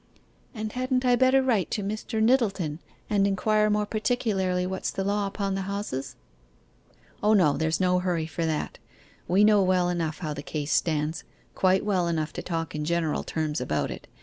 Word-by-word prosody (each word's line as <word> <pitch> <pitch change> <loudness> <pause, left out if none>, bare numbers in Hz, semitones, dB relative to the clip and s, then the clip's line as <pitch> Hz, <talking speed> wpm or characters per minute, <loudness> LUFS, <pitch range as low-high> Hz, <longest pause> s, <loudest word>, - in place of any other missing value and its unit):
'And 215 -1 -4
hadn't 255 +1 -1
I 245 -1 +5
better 260 +1 +4
write 225 -9 +1
to 205 - -2
Mr. 215 +2 -2
Nyttleton, 200 - +1 0.3
and 200 -1 +2
inquire 215 +2 +2
more 210 0 +1
particularly 205 -5 0
what's 190 +1 -3
the 195 - -3
law 200 +1 0
upon 195 0 -2
the 195 0 -3
houses?' 200 -10 -4 1.1
'O 210 +1 +4
no, 165 -9 +4
there's 160 +2 0
no 180 -1 +3
hurry 175 -3 -1
for 165 +1 -4
that. 155 -1 -3 0.5
We 190 +4 +4
know 210 -1 +5
well 185 -1 +2
enough 165 -3 -2
how 155 -4 -4
the 145 - -6
case 145 0 -4
stands 155 -1 0 0.3
quite 190 +1 +2
well 185 -4 +1
enough 160 -2 -1
to - - -5
talk 165 -2 -3
in 150 0 -3
general 165 -1 0
terms 155 -4 -2
about 75 -12 -1
it. - - -9
190 Hz, 180 wpm, -26 LUFS, 160-210 Hz, 1.1 s, I